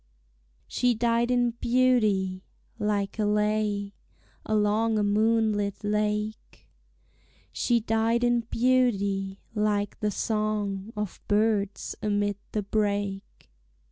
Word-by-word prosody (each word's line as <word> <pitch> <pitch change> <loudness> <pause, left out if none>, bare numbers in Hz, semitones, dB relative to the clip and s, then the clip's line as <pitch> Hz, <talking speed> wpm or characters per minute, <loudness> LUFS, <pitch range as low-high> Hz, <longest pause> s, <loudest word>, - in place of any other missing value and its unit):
She 245 -1 +1
died 235 +1 +1
in 245 -1 +2
beauty, 215 -7 +2 0.4
like 205 0 -1
a 210 - +2
lay 210 -1 0 0.5
Along 215 +1 +2
a 210 - +2
moonlit 210 -1 +1
lake; 210 +1 -2 0.8
She 235 -2 +1
died 225 +2 +1
in 240 0 +3
beauty, 200 -6 +1 0.2
like 210 -2 0
the 210 - 0
song 210 -1 -2
Of 210 -3 -4
birds 205 -1 0
amid 205 -1 0
the 210 - -1
brake. 200 - -2
210 Hz, 100 wpm, -27 LUFS, 205-225 Hz, 0.8 s, in